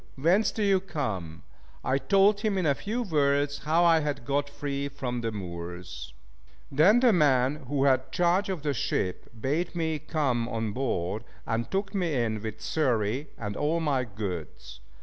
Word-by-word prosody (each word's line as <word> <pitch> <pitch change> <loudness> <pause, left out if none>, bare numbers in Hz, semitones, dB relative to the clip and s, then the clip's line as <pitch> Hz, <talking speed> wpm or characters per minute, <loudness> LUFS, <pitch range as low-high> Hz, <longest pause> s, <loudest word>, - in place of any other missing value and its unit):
Whence 180 +10 +3
do 215 - -2
you 195 -2 +4
come?" 105 - -4 0.4
I 130 +1 +2
told 200 +4 +4
him 210 -2 0
in 185 - 0
a 145 - +4
few 220 - -3
words 145 -5 +1
how 160 +3 +2
I 165 -1 +6
had 145 -5 -3
got 140 +2 0
free 140 -1 -3
from 125 -3 -4
the 115 -1 -2
Moors. 90 -3 -7 0.6
Then 185 - +5
the 245 -3 +5
man 145 -3 +2
who 140 0 0
had 130 -2 +2
charge 180 +3 +2
of 180 -6 -3
the 145 -2 0
ship 95 -6 -2
bade 150 +10 -1
me 160 -2 -1
come 135 -6 -1
on 115 -2 -2
board, 110 -4 -2 0.2
and 115 0 -2
took 195 +2 -2
me 175 -6 0
in 110 -4 0
with 110 -1 -6
Xury 130 -2 0
and 105 -2 -4
all 155 +6 +1
my 145 -5 +1
goods. 90 - -6
140 Hz, 170 wpm, -28 LUFS, 115-170 Hz, 0.6 s, I